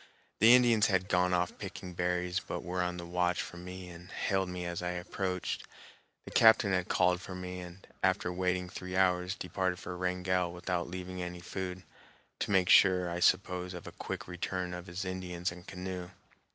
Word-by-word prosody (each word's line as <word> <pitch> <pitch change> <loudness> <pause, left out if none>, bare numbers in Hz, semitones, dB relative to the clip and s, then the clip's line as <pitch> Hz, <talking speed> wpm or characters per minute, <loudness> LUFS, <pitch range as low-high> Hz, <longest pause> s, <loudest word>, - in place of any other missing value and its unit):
The 115 +4 +9
Indians 120 -4 +5
had 95 -1 +1
gone 90 0 +3
off 90 -1 0
picking 90 -1 -7
berries, 90 +1 0
but - - -5
were 90 +1 -2
on 90 0 -1
the 85 - -6
watch 90 +1 +1
for 85 - -5
me 90 +1 -8
and 85 +1 -11
hailed 95 -3 0
me 90 0 -4
as 85 0 -3
I 90 - -1
approached. 90 +1 -3 0.6
The - - -9
captain 110 -3 +6
had 90 -1 0
called 90 0 +3
for 95 - -7
me, 90 0 -5
and, 90 +1 -10 0.2
after 95 -1 +1
waiting 90 0 0
three 90 0 -5
hours, 90 0 +2
departed 90 0 -1
for 90 - -6
Wrangell 90 -1 0
without 90 0 -2
leaving 90 0 -5
any 90 0 -5
food, 90 +1 -5 0.6
to - - -2
make 95 -3 +3
sure, 90 -2 +6
I 85 - -2
suppose, 90 0 +2
of 90 - -8
a - - -7
quick - - -6
return 90 0 -3
of 90 0 -7
his 90 +3 -4
Indians 90 -1 -3
and 90 0 -12
canoe. 90 -1 -5
90 Hz, 190 wpm, -32 LUFS, 90-95 Hz, 0.6 s, The